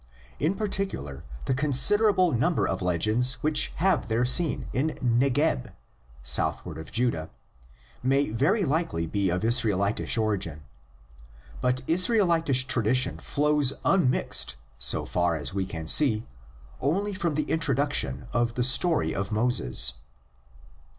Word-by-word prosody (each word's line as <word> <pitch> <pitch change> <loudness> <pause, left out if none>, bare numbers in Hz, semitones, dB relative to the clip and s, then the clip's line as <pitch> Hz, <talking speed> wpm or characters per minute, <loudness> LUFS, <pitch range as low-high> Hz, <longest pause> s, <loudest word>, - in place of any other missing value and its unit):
In 160 +6 0
particular 195 - -4 0.2
the - - 0
con 140 +3 -1
siderable 185 - +4
number 130 +9 +1
of 95 - -3
legends 110 +9 +1
which 150 0 +3
have 185 - +1
their 115 +2 +1
scene 155 +5 +1
in 150 +5 -1
Negeb 120 - +1 0.5
(southward 75 +6 -1
of 80 - -10
Judah) 115 -9 -1 0.7
may 135 -1 +1
very 180 - +1
likely 145 - -1
be 100 +3 -1
of 90 +3 -2
Israelitish 110 -1 +1
origin. 95 -9 -2 1.0
But 125 0 0
Israelitish 170 - +2
tradition 125 +1 +1
flows 145 -2 +1
unmixed, 130 - +1 0.2
so 65 0 +2
far 85 -1 0
as 80 +3 -2
we 95 -1 -2
can 80 -3 -6
see, 110 - +3 0.5
only 195 +9 -1
from 170 -5 -2
the 155 - 0
intro 160 -4 0
duction 135 - 0
of 120 0 0
the 125 - 0
story 155 +6 +2
of 100 +1 -4
Moses. 105 - +1
125 Hz, 130 wpm, -26 LUFS, 100-155 Hz, 1.0 s, siderable